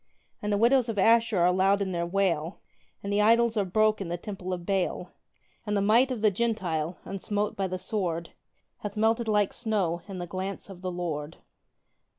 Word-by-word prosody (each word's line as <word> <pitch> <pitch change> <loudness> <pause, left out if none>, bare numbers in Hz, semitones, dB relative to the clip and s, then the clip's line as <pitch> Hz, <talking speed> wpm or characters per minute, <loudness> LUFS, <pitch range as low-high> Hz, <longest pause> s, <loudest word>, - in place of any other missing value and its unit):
And 210 - -2
the 205 - +2
widows 240 +2 +4
of 220 - -3
Ashur 225 +1 +4
are 180 +1 +4
loud 195 +2 +3
in 195 -2 -2
their 170 -1 -1
wail, 175 -3 0 0.4
And 200 0 -2
the 205 - +3
idols 230 +2 +4
are 210 - +2
broke 215 +3 +2
in 195 - -3
the 175 +1 -3
temple 190 0 -6
of 175 -1 -4
Baal; 190 -2 -1 0.5
And 210 -1 -1
the - - +2
might 225 +6 +4
of 250 -4 -3
the 215 -1 +4
Gentile, 185 -7 -1
unsmote 205 +1 -2
by 195 -1 -1
the 185 0 -3
sword, 180 -3 -3 0.5
Hath 210 0 -6
melted 225 +2 +2
like 210 -2 +2
snow 195 -7 -1
in 195 -2 -7
the 175 - -4
glance 190 +3 -5
of 180 -2 -11
the 185 -1 -3
Lord! 165 -4 -4
195 Hz, 195 wpm, -27 LUFS, 180-215 Hz, 0.5 s, widows